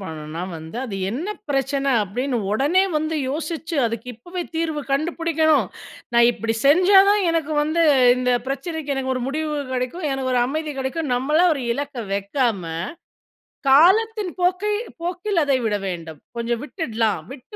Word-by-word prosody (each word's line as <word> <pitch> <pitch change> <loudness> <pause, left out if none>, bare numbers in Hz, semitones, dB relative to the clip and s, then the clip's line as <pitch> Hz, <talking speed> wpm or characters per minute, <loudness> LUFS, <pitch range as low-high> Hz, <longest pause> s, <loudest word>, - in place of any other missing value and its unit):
பண்ணணும்னா, 160 -2 -6
வந்து 160 +6 -8
அது 205 -6 -5
என்ன 290 - -3 0.2
பிரச்சனை 275 0 0
அப்படின்னு 245 +6 -2 0.2
உடனே 295 - +3
வந்து 315 +1 -1
யோசிச்சு, 320 +2 -4
"அதுக்கு 230 +1 -5
இப்போவே 350 +10 -6
தீர்வு 320 -2 -1
கண்டுபிடிக்கணும். 315 +1 +2 0.5
நான் 235 0 +6
இப்படி 225 -1 -2
செஞ்சா 370 +6 +6
தான் 415 -1 +3
எனக்கு 320 -2 -1
வந்து 315 +3 +1 0.3
இந்த 250 0 +1
பிரச்சனைக்கு 295 +1 -3
எனக்கு 260 -1 -1
ஒரு 255 - -3
முடிவு 305 +1 -2 0.2
கிடைக்கும். 260 +6 -2
எனக்கு 265 -1 -2
ஒரு 245 - +3
அமைதி 305 +2 -3
கிடைக்கும்." 265 +1 -2
நம்மளா 300 +8 +2
ஒரு 275 - -4
இலக்க 285 -2 -5
வைக்காம, 200 0 0 1.1
காலத்தின் 390 +6 +4
போக்கை 370 +4 +1 0.3
போக்கில் 355 +1 -1
அதை 270 -2 +2
விட 210 -1 +1
வேண்டும். 165 -4 -6 0.2
கொஞ்சம் 235 0 -1
விட்டுடலாம், 230 - -1
விட்டு 275 - -13
280 Hz, 145 wpm, -22 LUFS, 245-330 Hz, 1.1 s, நான்